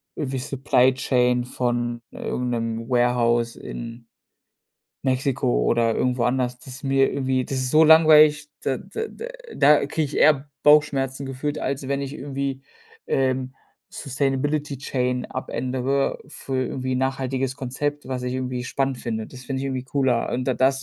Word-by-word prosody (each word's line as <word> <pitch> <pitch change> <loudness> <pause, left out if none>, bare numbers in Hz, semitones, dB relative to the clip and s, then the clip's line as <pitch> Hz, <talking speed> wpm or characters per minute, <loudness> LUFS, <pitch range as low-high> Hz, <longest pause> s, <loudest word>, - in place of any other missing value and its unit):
irgendwie 135 -3 -3
Supply 130 -1 +2
Chain 125 -1 +1
von 120 -1 -2
irgend 125 0 -3
'nem 115 -1 -3
Warehouse 120 -1 +2
in 115 0 -8 1.0
Mexiko 130 - +1
oder 115 - +2
irgendwo 125 0 0
anders, 125 0 0
das 125 - -13
ist 130 - -10
mir 135 0 +3
irgendwie 130 -2 0
das 135 - -3
ist 130 -1 0
so 155 +3 +6
langweilig, 155 -2 +6
da 130 -2 -1
da 320 - -5
da 465 - -8 0.3
da 145 0 +5
kriege 155 +3 -1
ich 145 - -6
eher 145 -2 +4
Bauchschmerzen 140 -3 +3
gefühlt, 145 +3 -3
als 140 0 -3
wenn 140 0 0
ich 140 +1 -5
irgendwie, 135 -1 -4 0.4
ähm, 130 -1 0 0.4
Sustainability 140 +1 -1
Chain 125 -2 -1
abändere 130 +1 -2
für 135 -3 -5
irgendwie 130 +1 -3
'n - - 0
nachhaltiges 130 0 -1
Konzept, 145 +2 -3
was 130 -1 -3
ich 125 0 -2
irgendwie 125 -1 -3
spannend 135 +1 -1
finde. 110 -2 -3
Das 125 -1 -11
finde 130 +1 -3
ich 135 - -2
irgendwie 130 -2 -3
cooler 130 -3 0
und 125 +1 -1
da 130 - +1
da 130 +2 +4
ist 135 - -2
130 Hz, 160 wpm, -23 LUFS, 125-140 Hz, 1.0 s, so